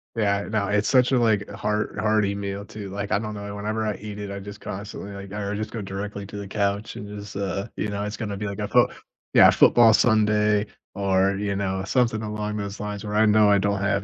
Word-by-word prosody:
Yeah, 100 -2 +1
no. 105 -2 0
It's 105 0 +1
such 130 0 +4
a, - - +5
like, 110 -4 +2
heart 105 +1 -2
hearty 105 -2 +1
meal, 100 0 -4
too. 105 -2 -8
Like, 100 +1 -5
I 100 - +3
don't 105 -1 -5
know, 100 0 -6
whenever 110 +2 -2
I 105 - -1
eat 105 0 -8
it, 100 -1 -5
I 100 0 -5
just 100 +1 -9
constantly, 100 0 -7
like, 100 0 -9
I 105 0 -4
r 100 +1 -2
just 110 +1 -4
go 115 - -4
directly 100 +1 -5
to 105 - -9
the 100 -1 -6
couch 100 +2 -1
and 105 - -7
just, 105 -1 -8
uh, 100 +2 -2
you 105 - -1
know, 100 0 -3
it's 105 +2 -4
gonna 105 -3 -4
be 105 +1 -4
like 100 +1 -5
a 105 - -2
foot - - +4 0.4
Yeah, - - +8
a - - +7
football 115 -2 +6
Sunday 105 -2 +3 0.3
or, 95 0 +2
you 100 -1 -2
know, 95 -1 -2
something 115 -2 +1
along 105 0 -3
those 100 0 -5
lines 105 0 -5
where 105 0 -3
I 110 +1 +5
know 105 -1 +5
I 100 - +5
don't 100 0 0
have 100 -1 +1
105 Hz, 250 wpm, -24 LUFS, 100-105 Hz, 0.4 s, Yeah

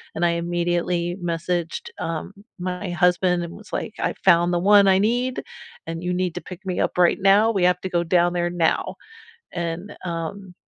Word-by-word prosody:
And 170 - -2
I 170 - +3
immediately 175 +1 -1
messaged, 170 0 -2 0.2
um, 165 +4 -4 0.3
my 180 +1 -4
husband 180 0 +2
and 170 - -7
was 210 0 -14
like, 220 - -3
"I - - 0
found 175 +1 +5
the 175 - +2 0.2
one 200 -1 +7
I 190 0 +5
need, 245 +4 0 0.4
and 165 +1 -5
you 180 0 -1
need 180 -2 -1
to 180 - -4
pick 185 0 -9
me 185 - -2
up - - -1
right 175 +2 +4
now, 195 +2 +6
we 195 -4 0
have 180 - +2
to 190 - -4
go 170 - +3
down 175 0 +2
there 175 0 0
now." 170 -2 0 0.6
And, 170 +3 -4
um, 175 +2 -5
175 Hz, 190 wpm, -23 LUFS, 170-190 Hz, 0.6 s, one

